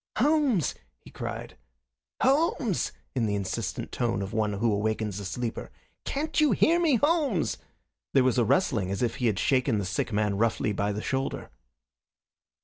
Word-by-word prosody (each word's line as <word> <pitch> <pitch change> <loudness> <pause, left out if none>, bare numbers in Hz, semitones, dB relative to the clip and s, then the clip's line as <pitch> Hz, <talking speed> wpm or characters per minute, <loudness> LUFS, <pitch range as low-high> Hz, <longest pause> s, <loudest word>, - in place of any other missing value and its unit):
"Holmes!" 275 - +2 0.2
he - - -16
cried. - - -6 0.7
"Holmes!" 270 - +2 0.2
in 120 -4 0
the 105 - 0
insistent 100 -2 -3
tone 115 -4 -1
of 100 +3 -6
one 105 -2 0
who 105 +2 +1
awakens 105 -1 -1
a 100 - -6
sleeper. 115 +5 -4 0.4
"Can't 310 +3 -1
you 300 - +4
hear 335 +2 +4
me, 320 -6 +3
Holmes?" 290 - +1 0.6
There 135 - +6
was 130 -1 +2
a - - +4
rustling, 115 - +1
as 100 +4 -2
if 120 - -1
he 125 - +1
had 105 -4 +1
shaken 130 -2 +2
the 100 - -1
sick 100 +5 -2
man 105 -1 0
roughly 110 -1 +1
by 100 +1 0
the 105 +1 -4
shoulder. 135 0 -3
120 Hz, 165 wpm, -27 LUFS, -, 0.7 s, There